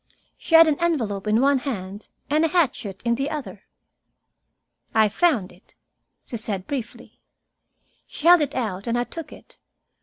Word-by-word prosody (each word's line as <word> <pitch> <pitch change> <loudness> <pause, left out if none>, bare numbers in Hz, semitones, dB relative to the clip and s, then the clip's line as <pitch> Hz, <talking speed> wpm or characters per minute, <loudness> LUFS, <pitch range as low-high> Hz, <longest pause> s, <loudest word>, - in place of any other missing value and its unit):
She 330 - 0
had 325 0 +9
an 300 -2 0
envelope 230 - -1
in 215 +3 +3
one 280 0 +3
hand, 205 -6 -6 0.2
and 305 +3 +1
a - - +4
hatchet 260 - -1
in 235 - +2
the 270 +4 -2
other. 230 -11 -7 1.3
"I 220 -1 +4
found 240 - +1
it," 180 +3 -23 0.5
she 235 - -6
said 205 -4 -4
briefly. 250 -3 -7 0.9
She 300 - -9
held 350 -1 +7
it 290 - -2
out, 210 -5 -3
and 235 +1 0
I 240 - +1
took 330 +5 -8
it. - - -16
240 Hz, 160 wpm, -23 LUFS, 205-305 Hz, 1.3 s, had